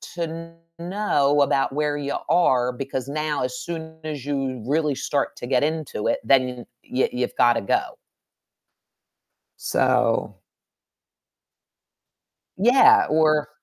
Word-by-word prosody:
to 165 0 -6 0.2
know 170 -6 +1
about 135 -1 +1
where 150 0 -1
you 140 -1 -3
are? 125 -8 +3
Because 130 +1 -5
now, 150 -1 -2
as 125 0 -4
soon 160 -1 -7
as 150 -4 -5
you 135 -4 -3
really 150 +1 0
start 140 +1 -2
to 120 - -7
get 130 +1 +2
into 155 -8 -3
it, - - 0
then 125 0 +1 0.2
y 130 - +1
you've 125 0 -3
gotta 120 -1 +4
go. 100 - +1 1.8
So - - +1 2.2
Yeah, 320 - +5
or 155 -1 +2
145 Hz, 115 wpm, -23 LUFS, 130-160 Hz, 2.2 s, Yeah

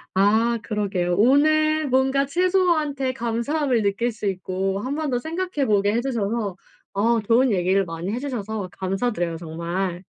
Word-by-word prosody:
아 220 +5 +3
그러게요. 190 -5 -1
오늘 310 +6 +3
뭔가 265 +2 +2
채소한테 315 -5 +1
감사함을 240 +1 0
느낄 205 +4 0
수 215 - -8
있고 190 0 -2
1 260 +7 -3
번 310 -1 -2
더 245 - +1
생각해 330 +1 -2
보게 205 -1 +2
해 235 - +1
주셔서 225 -5 -2 0.4
어 225 +3 +2
좋은 235 +4 +3
얘기를 190 0 +2
많이 165 +3 -5
해 235 - -2
주셔서 220 -7 -4
감사드려요 190 -3 -2
정말. 170 +2 -4
230 Hz, 305 characters per minute, -23 LUFS, 195-275 Hz, 0.4 s, 아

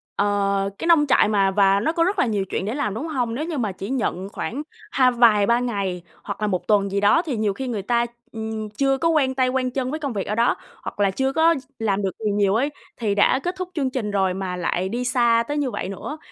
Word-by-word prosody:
ờ, 200 -1 +1
cái 335 - -4
nông 330 -3 +5
trại - - +4
mà 195 -2 +2
và 195 0 +4
nó 235 - 0
có 335 0 +1
rất 380 +2 0
là - - +4
nhiều 205 -4 -1
chuyện 190 - -2
để 215 - -2
làm, 280 -9 -1
đúng 280 +9 -4
hông? 245 -7 -2
Nếu 305 +5 -2
như 330 -3 -4
mà 220 -6 -1
chỉ 195 +3 -7
nhận 200 -7 -2
khoảng 250 +6 -4 0.3
hai 255 -2 +4
vài 230 -4 +5
ba 235 +2 +3
ngày 200 -7 -2 0.2
hoặc - - -6
là 210 - +1
1 180 -3 -2
tuần 200 -2 +3
gì 200 - 0
đó 205 +11 +4
thì 270 -8 -2
nhiều 210 -2 0
khi 265 +4 -5
người 220 -5 -2
ta, 235 +3 +1 0.3
ừm, 220 -1 -5
chưa 270 +5 +1
có 330 +4 +1
quen 275 -5 +2
tay, 255 -1 +2
quen 255 0 -1
chân 255 0 -2
với 310 - -3
công 280 -5 -3
việc 200 -3 -3
ở 210 - -1
đó, 235 +2 +3 0.3
hoặc - - -7
là 200 -1 +3
chưa 265 +6 -1
có 325 +2 +4
ch 265 -3 -8
làm 205 -2 0
được 195 - -1
gì 210 - +2
nhiều 200 -1 +2
ấy, 265 +6 +1 0.3
thì 210 -4 -1
đã 205 +5 +4
kết 355 +1 -2
thúc 365 -1 -4
chương 275 -5 0
trình 245 -5 -3
rồi 190 -2 +1
mà 185 -1 -4
lại 180 +1 -1
đi 240 +4 -2
xa 235 -2 +3
tới 290 - -2
như 280 -4 0
vậy - - -4
nữa, 240 +10 -6
230 Hz, 270 wpm, -23 LUFS, 200-265 Hz, 0.3 s, nông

